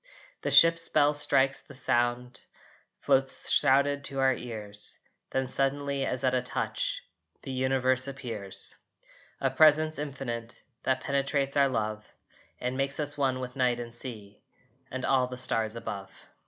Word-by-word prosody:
The - - -1
ship's 165 0 +6
bell 145 +1 +4
strikes 135 -2 +2
the 140 - -15
sound 120 -1 -1 0.5
Floats 135 0 +1
shrouded 140 0 +3
to 135 - -5
our 135 0 +3
ears, 105 -4 -2 0.3
Then 130 0 -1
suddenly, 140 +1 0
as 125 - -2
at 130 -1 +2
a 125 - +2
touch, - - -3 0.4
The 135 - -6
universe 130 0 +1
appears 115 -8 -4 0.7
A 135 -1 0
Presence 155 +2 +4
Infinite 130 -5 -6 0.2
That 130 - 0
penetrates 140 0 -1
our 140 -1 +4
love 110 -3 -3 0.4
And 125 +1 -2
makes 135 +1 -1
us 145 -1 -1
one 135 -2 0
with 125 -1 -6
night 125 -2 +1
and 120 -1 -7
sea 110 -5 -7 0.5
And 130 0 -4
all 130 -2 +3
the 125 0 -7
stars 115 -3 +1
above. 100 -4 -7
130 Hz, 145 wpm, -28 LUFS, 120-140 Hz, 0.7 s, ship's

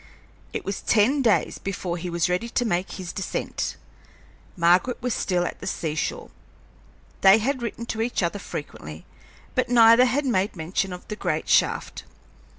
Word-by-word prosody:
It - - -5
was 195 - -3
ten 235 +7 +3
days 225 -5 +2
before 185 -3 -3
he 175 +1 -5
was 170 +1 +1
ready 180 +6 -1
to 245 +1 0
make 180 -3 -1
his 185 -3 -6
descent. 190 - -3 0.8
Margaret 180 +8 +3
was 250 -1 -1
still 180 -2 0
at - - -5
the - - -7
sea 160 -3 -2
shore. 155 - -3 0.9
They 195 +2 +8
had 255 +4 -1
written 235 0 -4
to 225 -1 -3
each 230 -4 -1
other 175 +4 -1
frequently, 80 - -8 0.5
but - - 0
neither 230 0 +7
had 275 +3 0
made 200 -6 0
mention 180 +3 -2
of 180 0 -9
the 210 - -4
great 155 -6 -2
shaft. - - +1
195 Hz, 165 wpm, -24 LUFS, 175-235 Hz, 0.9 s, They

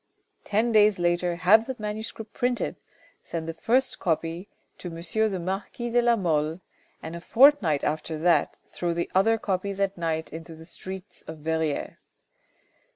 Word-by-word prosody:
Ten 220 +3 +1
days 210 -2 +5
later 175 0 +1
have 200 +6 +5
the 260 - -3
manuscript 215 +1 -6
printed, 245 -1 -1 0.5
send 165 -1 -5
the 165 - -3
first 245 +10 +1
copy 165 +3 -2 0.3
to - - -6
M. 165 - -8 0.3
the 195 - -3
marquis 195 +6 -4
de 240 +1 +4
la 240 0 +4
Mole, 160 -4 0 0.4
and 160 +1 -6
a 170 - -7
fortnight 225 - +5
after 155 +1 -2
that 170 +2 +2
throw 170 -1 -3
the 170 - -2
other 225 +4 +4
copies 195 -1 -2
at 195 -2 0
night 160 -2 -2
into 165 0 -8
the 160 0 -12
streets 190 +2 -9
of 160 - -7
Verrieres. 160 -1 -2
180 Hz, 155 wpm, -26 LUFS, 165-215 Hz, 0.5 s, days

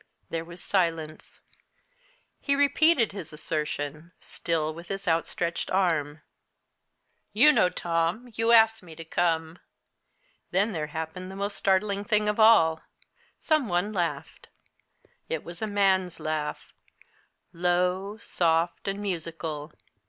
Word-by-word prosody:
There 165 -1 -2
was 170 +1 -11
silence. 165 -5 -2 1.0
He 280 - +1
repeated 285 -2 +4
his 195 -5 -8
assertion, 150 +1 -4
still 160 -2 -2
with 170 +2 -11
his 195 0 -5
outstretched 170 +1 -1
arm. 160 -6 0 1.1
"You 300 - +7
know, 180 -11 +3
Tom, 170 +9 -2
you 225 +2 +1
asked 225 -1 +6
me 165 -3 -12
to 165 +1 -9
come." 165 0 -1 0.9
Then 200 +5 +2
there 155 -5 -3
happened 160 +4 -6
the 190 - -8
most 200 +1 -3
startling 200 +1 +1
thing 210 0 +1
of 210 +1 0
all. 165 -8 +6 0.6
Some 310 -8 +1
one 180 +4 0
laughed. 175 -4 -3 0.8
It 160 - -3
was 170 0 -9
a 220 - -1
man's 190 -3 +1
laugh 155 -1 -4 0.8
low, 180 +3 0
soft, 170 -5 0
and 200 +1 -2
musical. 165 -4 -4
175 Hz, 125 wpm, -27 LUFS, 160-205 Hz, 1.1 s, You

